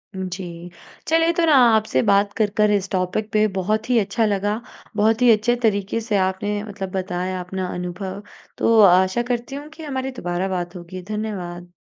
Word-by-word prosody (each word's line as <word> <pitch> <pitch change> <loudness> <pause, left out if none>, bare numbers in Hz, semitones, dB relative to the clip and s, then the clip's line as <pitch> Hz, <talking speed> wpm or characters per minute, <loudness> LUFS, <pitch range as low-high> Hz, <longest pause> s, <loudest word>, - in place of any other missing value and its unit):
जी। 180 -2 -6 0.4
चलिए, 330 +1 +3
तो 340 0 +2
ना 315 - +4 0.2
आपसे 215 -12 +1
बात 200 +1 +3
कर 215 -2 +1
कर 210 -1 +4
इस 200 -2 0
टॉपिक 190 +3 -1
पे 215 -1 +3
बहुत 215 +5 -1
ही 245 - +4
अच्छा 210 +3 0
लगा। 205 +1 0 0.4
बहुत 220 +2 +2
ही 245 -1 +7
अच्छे 220 +2 +3
तरीके 205 0 +1
से 215 -2 0
आपने 195 +2 -1
मतलब 195 -3 -6
बताया 185 0 -3
अपना 185 +1 -4
अनुभव। 185 +3 -5 0.3
तो 230 -1 +3
आशा 190 +3 +5
करती 245 +3 -3
हूँ 290 +1 -7
कि 320 +1 -12
हमारी 265 -2 -3
दोबारा 180 -5 -3
बात 175 0 -5
होगी। 180 +1 -8
धन्यवाद। 180 -5 -5
200 Hz, 175 wpm, -22 LUFS, 185-220 Hz, 0.4 s, ही